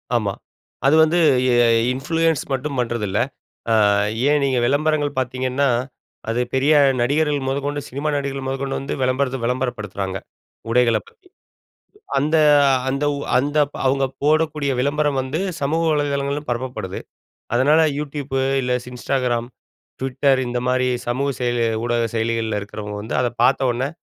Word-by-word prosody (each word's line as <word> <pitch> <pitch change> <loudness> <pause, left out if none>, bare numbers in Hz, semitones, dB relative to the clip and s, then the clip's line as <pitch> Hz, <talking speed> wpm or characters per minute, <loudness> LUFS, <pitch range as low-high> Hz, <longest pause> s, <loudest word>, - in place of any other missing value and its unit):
ஆமா. 105 -4 0 0.5
அது 140 +3 +5
வந்து 160 +2 +2 0.4
எ - - +4 0.4
இன்ஃப்ளூயன்ஸ் 165 +2 0
மட்டும் 135 +1 -3
பண்றதில்ல. 115 -4 -1 0.5
அ - - +4 0.6
ஏன் 150 0 +3
நீங்க 135 -2 +1
விளம்பரங்கள் 145 +1 0
பார்த்தீங்கன்னா, 130 +2 -1 0.6
அது 115 +2 0
பெரிய 135 +4 +3 0.3
நடிகர்கள் 145 +1 +1
மொதக்கொண்டு 145 +2 -2
சினிமா 140 +4 -3
நடிகர்கள் 140 -1 -4
மொதக்கொண்டு 135 +1 -2
வந்து, 135 - -4
விளம்பரத்த 130 +1 0
விளம்பரப்படுத்துறாங்க. 105 -6 -3 0.5
உடைகளப் 115 -3 +2
பத்தி. - - -26 0.9
அந்த 150 +4 +1 0.5
அந்த 135 +2 -1
உ - - -5 0.2
அந்த, 145 +3 0 0.3
அவுங்க 135 +1 +2 0.2
போடக்கூடிய 150 -2 +1
விளம்பரம் 145 +1 +1
வந்து 130 +5 -3 0.2
சமூக 160 +4 0
வலைதளங்களிலும் 145 0 -1
பரப்பப்படுது. 120 -6 -4 0.6
அதனால, 145 +6 +4 0.2
Youtube, 145 -2 -5 0.3
இல்ல 125 -1 -1
ஸ் - - -10
Instagram, 125 -2 -1 0.6
Twitter 135 +1 +2
இந்தமாரி 125 +1 0 0.2
சமூக 135 +4 0
செயலி 120 -1 0 0.2
ஊடக 120 -1 +1
செயலிகள்ல 115 -1 -1
இருக்கிறவங்க 105 0 -7
வந்து, 110 - -5
அத 125 - +1 0.2
பார்த்தவுனே 130 0 +2
135 Hz, 125 wpm, -21 LUFS, 120-145 Hz, 0.9 s, அது